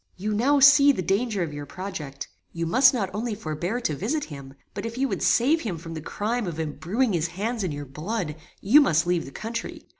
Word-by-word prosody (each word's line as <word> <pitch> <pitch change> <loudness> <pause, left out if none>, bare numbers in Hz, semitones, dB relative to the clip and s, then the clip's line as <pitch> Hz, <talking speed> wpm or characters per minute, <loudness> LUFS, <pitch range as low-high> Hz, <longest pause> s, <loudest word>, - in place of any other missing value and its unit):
"You 210 +3 -2
now 270 +7 +3
see 285 +1 +8
the 185 - -2
danger 200 +1 0
of 155 -3 -5
your 145 0 -7
project. 175 -8 -6 0.3
You 170 0 -2
must 255 +10 +6
not 200 -8 -2
only 220 +1 -2
forbear 175 +4 -3
to 155 -10 -1
visit 265 - -2
him, 140 -3 -9 0.2
but 200 - -5
if 230 +1 -5
you 270 +1 +1
would - - -3
save 295 +7 +3
him 195 -8 -3
from 165 +1 -8
the 160 - -6
crime 215 +6 -2
of 165 -2 -5
embruing 190 - -1
his 170 -1 0
hands 210 +6 -3
in 180 - -1
your 145 0 -5
blood, 155 - -4 0.3
you 265 +10 +6
must 160 - +3
leave 175 -1 0
the 135 - -10
country. 230 +8 -6
195 Hz, 220 wpm, -25 LUFS, 160-235 Hz, 0.3 s, see